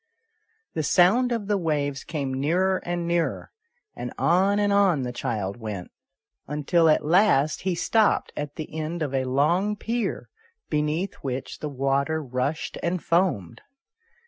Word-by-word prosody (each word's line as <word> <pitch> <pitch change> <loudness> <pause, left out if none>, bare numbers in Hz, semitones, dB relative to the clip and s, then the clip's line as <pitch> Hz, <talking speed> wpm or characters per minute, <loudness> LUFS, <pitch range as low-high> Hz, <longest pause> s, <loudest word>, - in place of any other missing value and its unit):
The 160 - -1
sound 190 - +4
of 230 -4 -1
the 205 -1 +1
waves 145 -4 -1
came 140 -4 -3
nearer 175 +8 +1
and 175 -1 -2
nearer, 170 -1 -1 0.4
and - - -5
on 190 +4 +3
and 205 -1 +2
on 190 -9 +3
the 125 - -3
child 110 -5 -3
went, 105 -6 -6 0.6
until 155 +3 +2
at 155 - +3
last 155 -4 +3
he 185 -1 -1
stopped 220 +4 +2
at 145 0 -5
the 155 -1 -7
end 160 +1 -3
of 140 -3 -3
a 130 -1 0
long 170 +11 +2
pier, 230 -1 -3 0.4
beneath 150 +5 0
which 130 -1 -4
the 150 - -4
water 140 +3 0
rushed 130 +4 -3
and 175 0 -1
foamed. 165 - 0
160 Hz, 145 wpm, -25 LUFS, 135-185 Hz, 0.6 s, sound